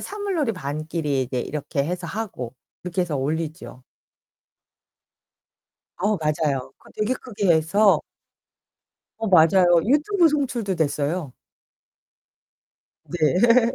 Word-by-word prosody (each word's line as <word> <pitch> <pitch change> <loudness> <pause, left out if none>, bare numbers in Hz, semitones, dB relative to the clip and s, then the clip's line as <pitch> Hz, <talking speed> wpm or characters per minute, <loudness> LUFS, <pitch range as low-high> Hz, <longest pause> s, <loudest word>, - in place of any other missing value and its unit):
사물놀이반끼리 165 - -2
이제 125 0 -3
이렇게 140 -1 -3
해서 175 +1 -4
하고. 185 - -5 0.3
이렇게 180 +1 -1
해서 165 -4 -3
올리죠. 155 -1 -4 2.2
어, 205 +3 +1
맞아요. 150 -4 -1
그거 - - -19
되게 215 +4 0
크게 205 -7 -4
해서 195 +6 +3 1.2
어 225 - -3
맞아요. 180 +1 +5 0.2
유튜브 320 - +3
송출도 250 -9 -1
됐어요. 145 -1 -1 1.8
네. 225 - +3
175 Hz, 220 characters per minute, -23 LUFS, 150-225 Hz, 2.2 s, 맞아요